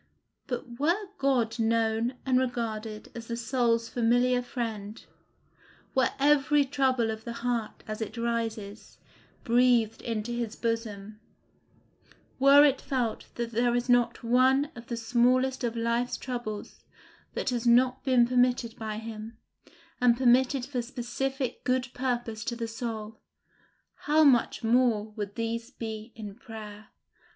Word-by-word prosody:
But 245 -2 -5
were 355 +7 +1
God 250 -4 +1
known 225 +2 +1
and 255 -1 +3
regarded 225 -4 -3
as 230 -1 -8
the 235 - -3
soul's 235 -1 +1
familiar 245 +2 +2
friend, 225 -4 -5 0.9
were 260 -2 +3
every 290 0 +4
trouble 260 -4 +1
of 220 0 -7
the 235 - -5
heart 235 -3 -2
as 215 +1 -5
it 220 +2 -5
rises, 225 -3 -3 0.5
breathed 235 -2 +3
into 225 0 -3
his 235 -2 -3
bosom; 215 -3 -3 1.2
were 280 +2 +8
it 280 -2 +2
felt 245 -5 -2
that 235 -1 -3
there 240 +1 +2
is 245 +1 -1
not 245 -1 +2
one 260 +4 +3
of 235 -1 -11
the 235 - -3
smallest 250 +3 +2
of 235 -1 -1
life's 235 +2 0
troubles 240 -5 -6 0.5
that - - -1
has 240 -1 -1
not 250 +2 +4
been 255 -3 +4
permitted 245 -2 +2
by 215 -1 -4
him, 220 0 -8 0.6
and 240 -1 +5
permitted 260 +1 +3
for 255 -3 -2
specific 260 +2 -4
good 255 0 0
purpose 240 -4 -2
to 245 -3 -2
the 230 -1 -4
soul, 225 -1 -5 0.9
how 310 +1 +5
much 250 -4 +3
more 225 -2 +2
would 205 -2 -6
these 230 0 -3
be 220 -3 -7
in 210 -3 -7
prayer! 215 -2 -10
235 Hz, 135 wpm, -28 LUFS, 225-255 Hz, 1.2 s, were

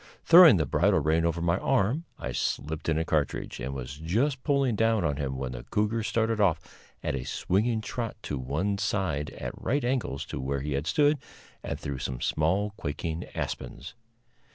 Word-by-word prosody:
Throwing 170 - +9
the 80 - +1
bridle 70 - +3
rein 80 +3 +2
over 85 0 -1
my 85 +2 +1
arm, 135 - +1
I - - -4
slipped 80 +3 -2
in 80 - +2
a 80 - 0
cartridge, 75 -4 -1
and 65 +2 -3
was 65 +2 -6
just 120 - 0
pulling 140 -5 +2
down 115 0 +2
on 70 -1 0
him 65 -2 -3
when 65 -1 -3
the - - -6
cougar 105 +2 +1
started 110 0 0
off 90 -5 +3 0.4
at - - -1
a 65 -2 -3
swinging 110 - 0
trot 115 +2 -4
to 70 - -3
one 85 +11 -1
side 80 -9 -1
at - - -5
right 140 +1 0
angles 120 - -1
to - - -2
where 70 +1 -2
he 75 +1 -3
had 70 +4 -2
stood, 145 0 +3 0.4
and - - -4
through 70 -2 -4
some 65 -1 -4
small 95 +11 +1
quaking 80 +3 -4
aspens. - - -5
85 Hz, 185 wpm, -28 LUFS, 70-115 Hz, 0.4 s, Throwing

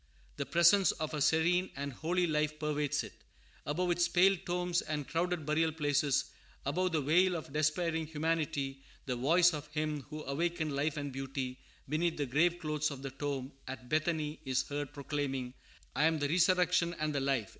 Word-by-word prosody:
The 140 - -3
presence 170 +3 +5
of 155 -1 -4
a 150 - -2
serene 170 +5 +3
and 140 0 -4
holy 175 +7 0
life 150 -1 0
pervades 150 -1 -1
it. - - -9 0.5
Above 175 +5 0
its 175 0 +2
pale 190 +2 +5
tombs 180 0 0
and 150 -3 -4
crowded 170 0 -1
burial 160 +2 +2
places, 145 -3 +1 0.4
above 180 +7 0
the 155 -3 +1
wail 180 +5 +4
of 155 -4 -6
despairing 160 +1 0
humanity, 150 -3 -1 0.2
the 125 - -1
voice 170 +8 +4
of 150 -1 -5
Him 150 -1 -2
who 155 0 -6
awakened 160 +1 -1
life 150 +2 0
and 145 -1 -3
beauty 135 -1 -4 0.3
beneath 165 +4 0
the 145 - 0
grave 165 +7 +2
clothes 150 -3 -1
of 140 -2 -8
the 135 - -4
tomb 135 -1 -4 0.2
at 130 -1 -7
Bethany 155 -1 0
is 130 -3 +1
heard 145 -1 -3
proclaiming, 140 -3 -3 0.4
"I 150 - +3
am 160 0 +3
the 145 -1 -1
Resurrection 180 0 +3
and 155 -1 -2
the 140 - 0
Life." 135 -6 0
150 Hz, 175 wpm, -32 LUFS, 140-170 Hz, 0.5 s, presence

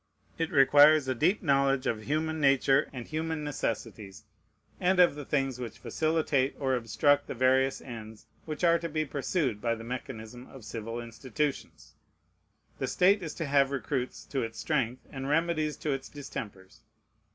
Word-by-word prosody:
It 165 -1 0
requires 145 +1 +6
a 130 - +1
deep 170 - +1
knowledge 140 -3 +2
of 110 -2 -1
human 160 +2 -1
nature 135 -1 +3
and 125 -3 -7
human 160 0 -3
necessities, 110 -7 -4 0.6
and 185 0 +2
of 175 -4 +6
the 145 -1 -8
things 135 -3 -1
which 120 -4 -6
facilitate 155 -4 0
or 135 -2 0
obstruct 130 +5 +2
the - - -5
various 130 +2 +2
ends 110 -3 -9 0.2
which 155 +1 -6
are 170 -1 +5
to 170 - -4
be 155 0 -1
pursued 140 - -1
by 115 -1 0
the 115 - -9
mechanism 120 0 -7
of 130 -5 -13
civil 115 +1 -5
institutions. 120 - -4 0.9
The - - -1
state 195 +3 +3
is 160 -4 -6
to 165 - -3
have 140 -1 +3
recruits 135 -2 -3
to 135 - -2
its 115 -1 -5
strength 125 +1 -1
and 135 0 -5
remedies 155 -1 0
to 150 - -2
its 135 -1 -4
distempers. 105 -9 -8
135 Hz, 165 wpm, -29 LUFS, 120-155 Hz, 0.9 s, requires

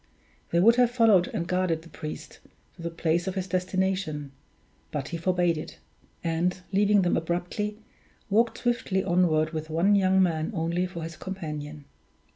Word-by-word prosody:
They 170 - +2
would 230 +6 +6
have 245 -1 +5
followed 225 -7 +4
and 170 - -3
guarded 180 -3 0
the 165 - -14
priest 155 -2 -8 0.4
to - - -12
the 170 - -3
place 165 +1 0
of 190 - -2
his 190 -2 -2
destination; 185 -5 -1 0.6
but 145 -2 -4
he 170 - -3
forbade 175 -1 +1
it; - - -8 0.5
and, 170 +2 0
leaving 205 0 +4
them 175 - +2
abruptly, 180 +5 -2 0.5
walked 225 +3 +2
swiftly 235 -6 0
onward 170 -4 +2
with 155 -1 -5
one 170 +6 +3
young 190 -1 +4
man 160 -3 0
only 170 +2 0
for 170 -2 -7
his 165 0 -6
companion. 150 -5 -6
180 Hz, 160 wpm, -27 LUFS, 165-190 Hz, 0.6 s, would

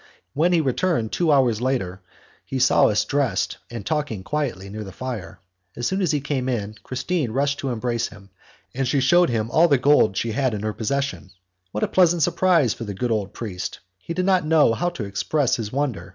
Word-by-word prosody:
When 165 +5 +2
he 170 -2 +4
returned 135 -4 0
two 170 -3 +1
hours 125 -6 +3
later, 110 -8 -1 0.4
he 135 - -4
saw 130 -1 +5
us 105 0 +1
dressed 130 -7 0
and 115 -4 -7
talking 150 -11 -2
quietly 125 -9 -3
near 105 +2 -6
the 95 - -9
fire. 95 -5 -6 0.4
As 120 - -4
soon 190 +6 0
as 175 -5 +2
he 150 - +1
came 135 -2 -2
in, 105 -4 -2
Christine 130 +2 -2
rushed 140 +4 0
to 135 - -2
embrace 120 0 -1
him, 100 -2 -15 0.4
and 135 0 -1
she 135 +2 +2
shewed 175 +7 +4
him 115 -1 -1
all 165 +6 +5
the 140 -4 +4
gold 125 -7 +3
she 115 - -1
had 125 0 0
in 105 - -5
her 110 0 -1
possession. 140 -2 -2 0.4
What 105 - -2
a - - +2
pleasant 175 -3 +3
surprise 170 - +3
for - - -7
the 100 -3 -5
good 120 +5 -2
old 105 -3 -1
priest! 95 -6 -5 0.2
He 170 - -6
did 185 +1 0
not 185 -2 +3
know 155 -6 +4
how 175 +10 0
to 155 -12 -6
express 125 +7 0
his 110 -3 -4
wonder! 125 -10 -2
125 Hz, 210 wpm, -23 LUFS, 110-150 Hz, 0.4 s, saw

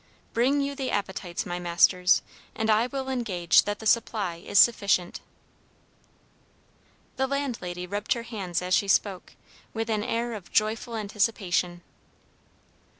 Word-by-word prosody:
Bring 265 +5 +2
you 280 0 -2
the 270 -2 -3
appetites, 190 -3 -3
my 175 0 -4
masters, 180 +1 +3 0.3
and 220 0 +1
I 220 +3 +3
will 265 +1 -5
engage 210 -10 +2
that 205 0 -2
the 220 - -10
supply 215 -6 +1
is 180 +4 -3
sufficient." 200 -6 +4 2.0
The 265 0 +1
landlady 235 -11 -3
rubbed 205 +3 -1
her 235 - -5
hands 195 -7 -4
as 180 0 -1
she 200 - +3
spoke, 195 -1 0 0.4
with 225 0 -2
an 210 -1 0
air 235 +1 -2
of 205 -5 -9
joyful 225 +2 0
anticipation. 200 -5 -1
210 Hz, 135 wpm, -26 LUFS, 180-235 Hz, 2.0 s, sufficient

